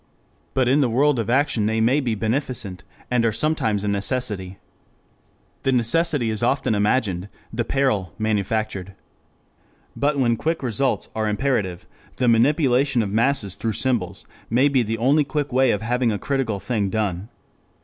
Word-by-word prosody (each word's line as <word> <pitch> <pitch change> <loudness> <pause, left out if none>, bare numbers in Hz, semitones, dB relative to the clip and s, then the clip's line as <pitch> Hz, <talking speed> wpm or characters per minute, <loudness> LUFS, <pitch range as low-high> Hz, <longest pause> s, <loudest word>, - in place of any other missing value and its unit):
But 130 -2 +2
in 140 +4 +4
the 130 - +2
world 135 +3 +2
of 115 - -2
action 125 -5 +2
they 110 +1 0
may 120 +6 +3
be 120 -6 -1
beneficent, 110 -5 -2 0.3
and 125 -2 +2
are 115 - +2
sometimes 110 -6 0
a - - -2
necessity. 100 -2 -2 1.0
The 135 - +1
necessity 130 +1 +2
is 110 - -2
often 120 -1 +1
imagined, 105 -3 0 0.3
the 120 +1 -1
peril 115 -10 0
manufactured. 105 -2 -2 1.0
But 145 +1 0
when 120 -4 +2
quick 160 +2 -2
results 130 +2 -1
are 110 -1 0
imperative, 105 -7 -1 0.3
the 125 - 0
manipulation 130 +1 +3
of 100 - -4
masses 115 -3 +1
through 110 +3 -3
symbols 110 -7 -2 0.2
may 130 +5 +3
be 135 -3 +2
the 115 0 -2
only 140 +6 +3
quick 145 -1 -3
way 130 0 +4
of 105 -1 0
having 120 +1 +1
a 105 - -1
critical 130 -5 -2
thing 100 0 -1
done. 100 -1 -2
115 Hz, 160 wpm, -22 LUFS, 105-135 Hz, 1.0 s, in